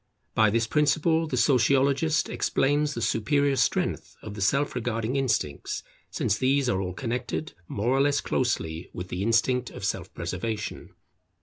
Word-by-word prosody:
By 110 -1 +4
this 115 +2 +1
principle 155 +5 +2
the 130 - -2
Sociologist 140 +5 +3
explains 145 +1 +1
the 115 - -2
superior 140 +5 +2
strength - - 0
of 110 - -7
the 105 - -7
self 140 +10 +2
regarding 115 0 -2
instincts, 115 - -1 0.3
since 105 +1 -1
these 135 +1 +2
are 95 -5 +1
all 90 -1 -3
connected 125 +6 -3
more 120 +6 0
or - - +4
less 140 0 +3
closely 80 -10 -1
with 90 0 -6
the 90 - -3
instinct 115 +3 +2
of - - -7
self - - -3
preservation. 110 -2 -4
125 Hz, 150 wpm, -26 LUFS, 110-140 Hz, 0.3 s, By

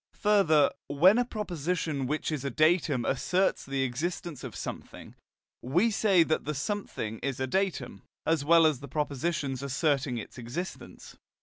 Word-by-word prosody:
Further, 195 -8 +4 0.2
when 180 +11 +5
a 245 - +2
proposition 170 - -2
which 155 +3 -2
is 150 -4 -3
a 140 - -1
datum 155 -5 +2
asserts 180 +8 +1
the 135 -1 -1
existence 155 +4 -4
of - - -7
something, - - -8 0.5
we 175 - +2
say 200 -5 +4
that 160 -1 -1
the 150 +1 -3
something 140 - -4
is 135 -2 -3
a 130 - 0
datum, 190 +7 -2 0.2
as 160 -3 +1
well 165 +2 +6
as 155 -5 +2
the 140 - -9
proposition 145 +1 -2
asserting 140 -2 0
its 115 - -8
existence. 140 +11 -7
155 Hz, 150 wpm, -29 LUFS, 135-180 Hz, 0.5 s, well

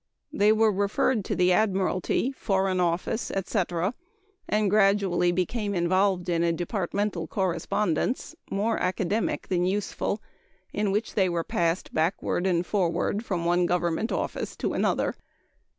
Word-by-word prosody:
They 205 +1 +4
were 220 0 +4
referred 205 +3 +1
to - - -1
the 180 0 +3
Admiralty, 195 +4 +1
Foreign 195 -7 0
Office, 175 +6 0
etc., 185 -1 -1 0.6
and 210 0 +2
gradually 195 -3 +3
became 200 +4 -1
involved 185 +1 +2
in 170 -1 +1
a 170 - +2
departmental 180 0 -2
correspondence 190 - -1 0.2
more 215 +3 0
academic 190 +4 -1
than 175 -1 +1
useful 200 +2 -1 0.5
in 205 -1 0
which 210 +3 -1
they 190 -3 +2
were 170 -1 -1
passed 170 +1 -1
backward 175 +2 0
and 175 -1 +1
forward 200 +2 0
from 180 -7 -2
one 175 +1 +3
government 175 +4 0
office - - -3
to - - -2
another. - - +1
190 Hz, 135 wpm, -26 LUFS, 175-205 Hz, 0.6 s, They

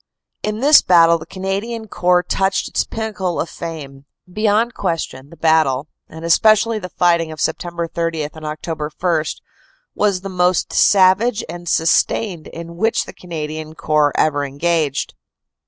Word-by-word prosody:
In 215 +1 -3
this 295 +2 +7
battle 170 -2 +5
the 160 - -11
Canadian 200 +4 -4
Corps 180 -2 +2
touched 190 +2 0
its - - -1
pinnacle 210 -6 -3
of - - -1
fame. 145 -5 -8 0.2
Beyond 215 +5 +1
question 160 -7 -4
the 170 - -15
battle, 155 -3 +2 0.2
and 160 +1 -9
especially 215 +5 +4
the 180 -2 -7
fighting 170 -3 +1
of 155 - -8
Sept. 170 +2 -3
30 165 -2 -1
and 150 - -5
Oct. 155 0 -5
1, 170 -4 +1 0.7
was 200 -3 0
the 195 - -6
most 180 -1 0
savage 200 +4 +4
and 175 +1 -7
sustained 165 +2 +1
in 170 0 -9
which 225 +4 +1
the - - -10
Canadian 155 -2 -6
Corps 150 -2 +2
ever 145 -2 +1
engaged. 145 -1 -1
170 Hz, 145 wpm, -19 LUFS, 155-195 Hz, 0.7 s, this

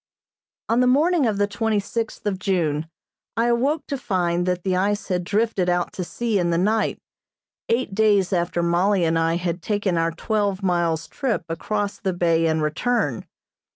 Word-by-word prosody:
On 230 +2 +2
the 250 - +4
morning 300 +2 +3
of 210 -2 0
the 205 - +3
twenty 210 +1 0
sixth 225 +3 -4
of 195 -3 -1
June 160 -6 0 0.5
I 230 - +3
awoke 265 +6 +1
to 280 -3 -4
find 175 -5 0
that 180 -1 -1
the 185 -1 0
ice 205 +3 0
had 180 -1 0
drifted 205 -1 0
out 175 0 0
to 185 - -3
sea 215 +5 -1
in 175 -1 +1
the 170 - +1
night, 215 +5 +1 0.7
eight 230 -3 0
days 205 -2 +3
after 175 -1 0
Mollie 175 +2 +2
and 165 0 +2
I 165 0 +1
had 175 0 -2
taken 205 -2 0
our 165 0 +2
twelve 200 +2 -1
miles 170 -3 0
trip 255 - -2
across 205 +5 -3
the 190 -2 -1
bay 165 -2 +2
and 160 -1 +1
return. 155 - -1
190 Hz, 180 wpm, -23 LUFS, 170-220 Hz, 0.7 s, the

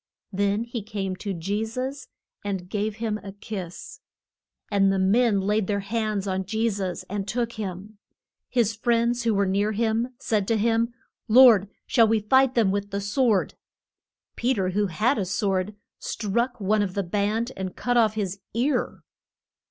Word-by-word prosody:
Then 200 +3 +1
he 235 -1 -5
came 195 -3 -4
to 200 - -4
Je 195 +5 -2
sus 255 +4 -4 0.4
and 195 -3 -3
gave 210 0 -1
him 220 -1 -2
a 195 -2 -9
kiss. 195 -4 -7 0.7
And 195 -1 +4
the 195 - +1
men 205 +3 +3
laid 205 0 +1
their 200 -1 0
hands 215 -1 -2
on 190 -1 -1
Je 220 +2 +1
sus 190 -3 -3
and 200 0 -4
took 235 +2 -1
him. 205 0 -6 0.5
His 230 -4 +2
friends 235 +1 +1
who 225 -2 +2
were 200 0 +2
near 200 +3 +1
him 230 +3 0
said 210 -5 -1
to 225 - +2
him, 230 +2 +1 0.4
Lord, 225 -4 +7 0.2
shall 230 -3 +4
we 220 0 +3
fight 260 +5 +3
them 220 -5 +3
with 200 0 -2
the 200 0 -2
sword? 205 0 +1 0.8
Pe 255 +2 +1
ter 190 -3 0
who 205 +2 +1
had 215 - +1
a 195 - 0
sword 190 +1 -1 0.2
struck 235 +4 -2
one 210 +1 +2
of 190 -3 -2
the 200 - 0
band 210 +6 -1
and 190 -1 -5
cut 245 0 -1
off 220 -3 +4
his 200 -2 -3 0.2
ear. 255 +3 0
210 Hz, 170 wpm, -25 LUFS, 195-230 Hz, 0.8 s, Lord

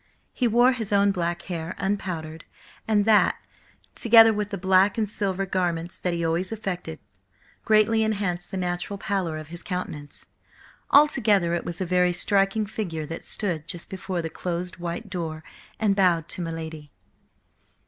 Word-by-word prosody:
He 250 - +1
wore 240 +3 +5
his 225 -5 -4
own 200 0 +4
black 175 -2 -2
hair, 170 -2 -5
unpowdered, 180 -5 -3 0.4
and 210 -2 +3
that, 220 -1 +5 0.6
together 225 -1 +7
with 210 -1 -2
the 200 - -4
black 190 +2 +3
and 220 -2 +1
silver 195 -2 -2
garments 175 -3 -2
that 180 - -1
he 170 -1 -1
always 170 +4 -1
affected, 180 -7 -4 0.7
greatly 220 +1 +4
enhanced 200 -5 -1
the 190 - -5
natural 180 +2 -3
pallor 190 -5 -2
of 155 0 -9
his 170 +1 -7
countenance. 155 -6 -6 0.6
Altogether 215 - +4
it 170 - -2
was 175 +1 -5
a - - 0
very 180 0 +2
striking 195 +3 +1
figure 175 -7 -4
that 165 +2 -7
stood 170 -7 -3
just 175 -1 -7
before 185 -2 -3
the 160 - -3
closed 180 +1 -4
white 175 +6 -5
door 165 -4 -5 0.4
and 205 -3 +2
bowed 175 -4 +3
to - - -4
my 165 - -3
lady. 160 -3 -7
185 Hz, 160 wpm, -25 LUFS, 170-205 Hz, 0.7 s, together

